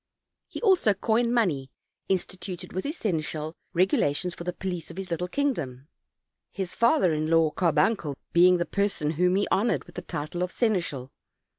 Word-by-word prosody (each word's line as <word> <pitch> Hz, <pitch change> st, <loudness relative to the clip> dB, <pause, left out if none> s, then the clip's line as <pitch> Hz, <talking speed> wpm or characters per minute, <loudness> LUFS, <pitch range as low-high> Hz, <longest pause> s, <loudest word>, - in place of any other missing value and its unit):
He -, -, -7 dB
also 365 Hz, -, +4 dB
coined 230 Hz, +4 st, +1 dB
money, 170 Hz, -, +1 dB, 0.4 s
instituted 185 Hz, -1 st, -3 dB
with 185 Hz, -, -3 dB
his 300 Hz, +4 st, -3 dB
seneschal 155 Hz, -5 st, -2 dB, 0.2 s
regula 175 Hz, -5 st, +2 dB
tions 180 Hz, +3 st, -3 dB
for 170 Hz, -, -8 dB
the 180 Hz, -, -2 dB
police 180 Hz, -1 st, -5 dB
of 170 Hz, -, -10 dB
his 190 Hz, -2 st, -6 dB
little 175 Hz, +2 st, -1 dB
kingdom; 155 Hz, -, -2 dB, 0.6 s
his 190 Hz, -2 st, -4 dB
father 230 Hz, -, +3 dB
in 155 Hz, +1 st, -1 dB
law 165 Hz, -1 st, +4 dB
Carbuncle 170 Hz, -3 st, +1 dB, 0.2 s
being 180 Hz, +1 st, +6 dB
the 175 Hz, -, -1 dB
person 200 Hz, -7 st, 0 dB
whom 180 Hz, +3 st, +2 dB
he 200 Hz, -, +1 dB
honored 220 Hz, +5 st, +2 dB
with -, -, -16 dB
the 180 Hz, -, -5 dB
title 155 Hz, +1 st, -5 dB
of 180 Hz, 0 st, -1 dB
seneschal. 170 Hz, -, -1 dB
180 Hz, 170 wpm, -27 LUFS, 160-200 Hz, 0.6 s, being